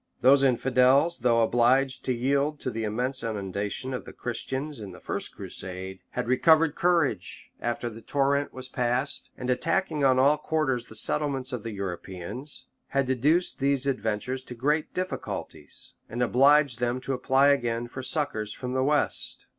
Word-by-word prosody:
Those 135 Hz, +2 st, +6 dB
infidels, 130 Hz, +5 st, +3 dB
though 115 Hz, -1 st, +3 dB
obliged 130 Hz, +3 st, +2 dB
to -, -, 0 dB
yield 140 Hz, +4 st, 0 dB
to 130 Hz, -, -1 dB
the 115 Hz, -1 st, -3 dB
immense 125 Hz, +5 st, -2 dB
inundation 105 Hz, +3 st, -2 dB
of 125 Hz, -, -5 dB
Christians 135 Hz, +4 st, -3 dB
in 100 Hz, -4 st, -8 dB
the -, -, -12 dB
first -, -, -4 dB
crusade, 95 Hz, 0 st, -5 dB
had 125 Hz, -1 st, -3 dB
recovered 155 Hz, +4 st, +4 dB
courage 165 Hz, -, 0 dB
after 120 Hz, 0 st, -2 dB
the 115 Hz, -1 st, -8 dB
torrent 140 Hz, +2 st, 0 dB
was 130 Hz, 0 st, -7 dB
past; 125 Hz, +2 st, -1 dB
and 125 Hz, -, -5 dB
attacking 155 Hz, +4 st, 0 dB
on 130 Hz, -1 st, +4 dB
all 140 Hz, +3 st, +5 dB
quarters 150 Hz, -6 st, -1 dB
the 110 Hz, -, -9 dB
settlements 135 Hz, +1 st, 0 dB
of 125 Hz, -, -3 dB
the 115 Hz, -, -5 dB
Europeans, 100 Hz, -, -4 dB, 0.2 s
had 135 Hz, -1 st, 0 dB
Deduced 145 Hz, +8 st, +1 dB
these 140 Hz, 0 st, +1 dB
adventurers 130 Hz, -1 st, -2 dB
to 125 Hz, -, -8 dB
great 150 Hz, +6 st, 0 dB
difficulties, 185 Hz, 0 st, -5 dB, 0.2 s
and 120 Hz, +2 st, -1 dB
obliged 135 Hz, +1 st, +4 dB
them 120 Hz, +1 st, 0 dB
to 135 Hz, -, -3 dB
apply 135 Hz, +2 st, +3 dB
again 120 Hz, -4 st, 0 dB
for 130 Hz, +2 st, -7 dB
succors 130 Hz, -6 st, -1 dB
from 125 Hz, -1 st, -5 dB
the 130 Hz, 0 st, +1 dB
west. 145 Hz, +2 st, 0 dB
130 Hz, 160 wpm, -27 LUFS, 120-140 Hz, 0.2 s, Those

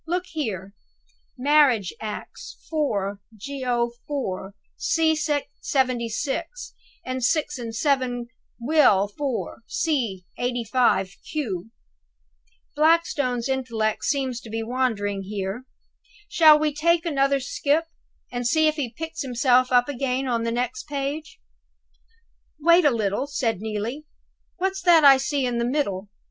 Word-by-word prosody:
Look 360 Hz, +2 st, -1 dB
here: 200 Hz, -, -4 dB, 0.6 s
'Marriage 265 Hz, -7 st, +3 dB
Acts, 215 Hz, -1 st, -7 dB
4 205 Hz, -11 st, -1 dB, 0.2 s
Geo. 245 Hz, 0 st, -2 dB, 0.2 s
IV., 195 Hz, -9 st, -3 dB, 0.2 s
c. 325 Hz, -8 st, +2 dB
76, 280 Hz, -, -2 dB, 0.3 s
and 255 Hz, 0 st, -3 dB
6 300 Hz, +2 st, +1 dB
and 230 Hz, -2 st, -6 dB
7 255 Hz, -3 st, 0 dB, 0.3 s
Will. 235 Hz, -7 st, +4 dB
IV., 275 Hz, -5 st, -3 dB
c. 235 Hz, -, -1 dB
85 240 Hz, -6 st, +1 dB
(q).' 220 Hz, -, -3 dB, 1.1 s
Blackstone's 295 Hz, -6 st, +2 dB
intellect 230 Hz, -5 st, -1 dB
seems 265 Hz, -4 st, -1 dB
to 225 Hz, -, -11 dB
be 225 Hz, +1 st, -3 dB
wandering 220 Hz, -5 st, -1 dB
here. 195 Hz, +4 st, -4 dB, 0.6 s
Shall 320 Hz, -8 st, +7 dB
we 300 Hz, -1 st, 0 dB
take 335 Hz, +3 st, +2 dB
another 275 Hz, -3 st, +2 dB
skip, 290 Hz, +4 st, 0 dB, 0.5 s
and 245 Hz, -1 st, -2 dB
see 315 Hz, +5 st, +3 dB
if 310 Hz, 0 st, 0 dB
he 260 Hz, -6 st, -2 dB
picks 325 Hz, 0 st, -5 dB
himself 255 Hz, -1 st, +2 dB
up 245 Hz, -1 st, +4 dB
again 265 Hz, -1 st, -1 dB
on 235 Hz, -2 st, 0 dB
the 230 Hz, 0 st, -1 dB
next 250 Hz, +2 st, -3 dB
page?" 290 Hz, +2 st, -4 dB, 1.2 s
"Wait 340 Hz, +3 st, +5 dB
a -, -, +7 dB
little," 220 Hz, +1 st, -1 dB
said 230 Hz, -8 st, -1 dB
Neelie; 220 Hz, +7 st, -4 dB, 0.5 s
"what's 385 Hz, +1 st, -1 dB
that 345 Hz, -3 st, +6 dB
I 275 Hz, -1 st, +9 dB
see 275 Hz, 0 st, -1 dB
in 240 Hz, -1 st, -1 dB
the -, -, +1 dB
middle?" 210 Hz, -8 st, -1 dB
255 Hz, 125 wpm, -24 LUFS, 230-300 Hz, 1.2 s, I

